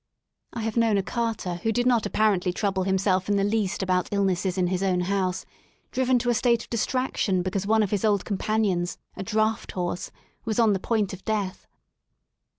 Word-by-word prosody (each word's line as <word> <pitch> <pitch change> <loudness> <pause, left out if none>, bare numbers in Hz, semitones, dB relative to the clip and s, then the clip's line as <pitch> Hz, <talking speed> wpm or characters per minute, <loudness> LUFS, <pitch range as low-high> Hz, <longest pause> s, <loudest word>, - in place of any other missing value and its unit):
I 235 - -5
have 225 +1 -3
known 225 -3 +3
a 195 - +1
carter 225 -5 -2
who 225 +6 -1
did 245 +2 0
not 240 -4 +3
ap - - -12
parently 200 -4 +2
trouble 190 0 -1
himself 190 0 +1
in 205 - +3
the 200 - +2
least 205 -2 0
about 185 -1 0
illnesses 190 -2 0
in 185 - +2
his 180 +1 -1
own 185 -2 +1
house, 185 0 -1 0.5
driven 260 -1 +2
to 245 0 +1
a - - +3
state 235 0 +2
of - - -17
distraction 230 -5 0
because 190 +1 -2
one 220 0 +4
of 200 - -2
his 205 -3 0
old 205 -3 +2
companions, 200 -3 0 0.2
a - - -6
draught 215 +2 0
horse, 175 0 -3 0.3
was 220 -2 -2
on 225 -3 +4
the 190 - -1
point 215 -2 0
of 190 - -9
death. 205 -4 -2
200 Hz, 200 wpm, -25 LUFS, 185-220 Hz, 0.5 s, one